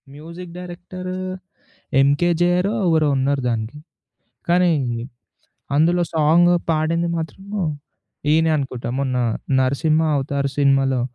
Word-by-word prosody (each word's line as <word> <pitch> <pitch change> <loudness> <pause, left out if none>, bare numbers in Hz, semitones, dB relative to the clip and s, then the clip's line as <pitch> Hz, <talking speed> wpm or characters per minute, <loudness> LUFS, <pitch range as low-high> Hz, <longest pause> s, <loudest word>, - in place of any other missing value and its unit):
Music 170 +3 -10
director 180 +1 -7 0.9
ఎంకే‌జేఆరో 175 +7 +2
ఎవరో 160 -2 +3
ఉన్నారు 135 +1 0
దానికి. 115 +4 -3 0.7
కానీది 155 -10 +1 0.7
అందులో 170 +4 +3
సాంగ్ 165 +3 +4 0.2
పాడింది 165 +2 0
మాత్రం 165 +4 -6 0.9
ఈయనే 160 +1 +3
అనుకుంటా 130 -4 -4
మొన్న 130 -2 -1 0.4
'నరసింహ 155 +5 +2
అవతార్' 140 0 -1
సినిమాలో 135 -2 +3
155 Hz, 90 wpm, -21 LUFS, 140-175 Hz, 0.9 s, సాంగ్